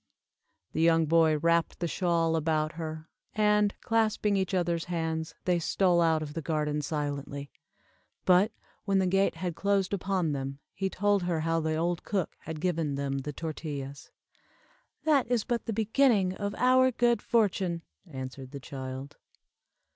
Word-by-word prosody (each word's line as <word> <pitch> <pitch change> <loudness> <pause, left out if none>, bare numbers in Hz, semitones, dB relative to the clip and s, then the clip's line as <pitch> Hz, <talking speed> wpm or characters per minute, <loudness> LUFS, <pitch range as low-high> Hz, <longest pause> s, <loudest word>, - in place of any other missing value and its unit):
The 160 - 0
young 165 -1 +4
boy 160 0 +4
wrapped 170 +2 +1
the 170 - -1
shawl 165 -2 +1
about 155 -1 +1
her, 160 -1 -6 0.3
and, 210 -1 +3
clasping 215 -2 +1
each 190 -2 0
other's 170 -2 0
hands, 160 -2 -3
they 180 -1 +2
stole 175 +1 +2
out 160 -2 +3
of 150 -1 -7
the 165 - -3
garden 150 -1 -1
silently, 145 -1 -4 0.7
but, 185 +4 +5 0.3
when 195 -2 +2
the 190 - +3
gate 195 0 +2
had 175 +1 -3
closed 200 0 +1
upon 185 -4 0
them, 135 -1 -3 0.2
he 190 0 -2
told 205 +1 +1
her 175 -3 -1
how 165 +1 +1
the 160 0 -1
old 170 +2 -1
cook 190 -5 -2
had 160 -1 -7
given 160 -4 0
them 140 -1 -2
the 150 +2 -5
tortillas. 145 -3 -6 0.9
"That 290 -6 +3
is 240 -3 +1
but 240 -2 -2
the - - 0
beginning 220 -3 +3
of 200 +1 -4
our 255 +1 +5
good 240 -1 +2
fortune," 190 -7 +1 0.2
answered 130 -2 -7
the 140 - -7
child. 130 0 -7
170 Hz, 155 wpm, -29 LUFS, 155-195 Hz, 0.9 s, but